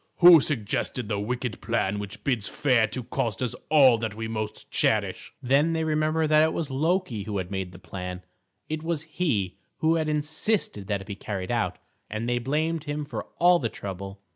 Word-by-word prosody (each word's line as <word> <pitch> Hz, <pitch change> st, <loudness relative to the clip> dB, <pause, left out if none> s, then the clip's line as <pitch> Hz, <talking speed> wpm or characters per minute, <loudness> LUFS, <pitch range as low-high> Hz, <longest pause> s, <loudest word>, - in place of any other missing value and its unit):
"Who 175 Hz, -3 st, +9 dB
suggested 125 Hz, -2 st, -1 dB
the 105 Hz, -2 st, 0 dB
wicked 120 Hz, +2 st, -3 dB
plan 105 Hz, -3 st, 0 dB
which 105 Hz, +1 st, -7 dB
bids 120 Hz, -7 st, 0 dB
fair 125 Hz, -6 st, +2 dB
to 125 Hz, +3 st, -5 dB
cost 115 Hz, 0 st, -2 dB
us 125 Hz, -, -1 dB, 0.2 s
all 135 Hz, -6 st, +6 dB
that 110 Hz, -2 st, -3 dB
we 115 Hz, 0 st, -4 dB
most 110 Hz, -1 st, -5 dB
cherish?" -, -, 0 dB
Then 140 Hz, +6 st, +3 dB
they 160 Hz, 0 st, 0 dB
remembered 155 Hz, 0 st, +1 dB
that 155 Hz, 0 st, +6 dB
it 160 Hz, 0 st, +3 dB
was 155 Hz, -4 st, -3 dB
Loki 155 Hz, -, 0 dB
who 105 Hz, 0 st, -3 dB
had 95 Hz, 0 st, -4 dB
made 95 Hz, -2 st, -3 dB
the 90 Hz, -, -12 dB
plan; 90 Hz, 0 st, -7 dB, 0.4 s
it 155 Hz, 0 st, -3 dB
was 160 Hz, -2 st, -1 dB
he 150 Hz, -, -1 dB, 0.2 s
who 160 Hz, +1 st, +2 dB
had 155 Hz, -1 st, 0 dB
insisted 150 Hz, -, -1 dB
that 100 Hz, -2 st, -1 dB
it -, -, -10 dB
be 105 Hz, -, -5 dB
carried 95 Hz, -2 st, -4 dB
out; -, -, 0 dB, 0.3 s
and 110 Hz, +2 st, -3 dB
they 120 Hz, 0 st, +1 dB
blamed 155 Hz, +5 st, -1 dB
him 145 Hz, 0 st, -3 dB
for 125 Hz, -7 st, -5 dB
all 175 Hz, 0 st, +5 dB
the 115 Hz, -, -1 dB
trouble. 100 Hz, -1 st, -7 dB
125 Hz, 195 wpm, -26 LUFS, 105-155 Hz, 0.4 s, Who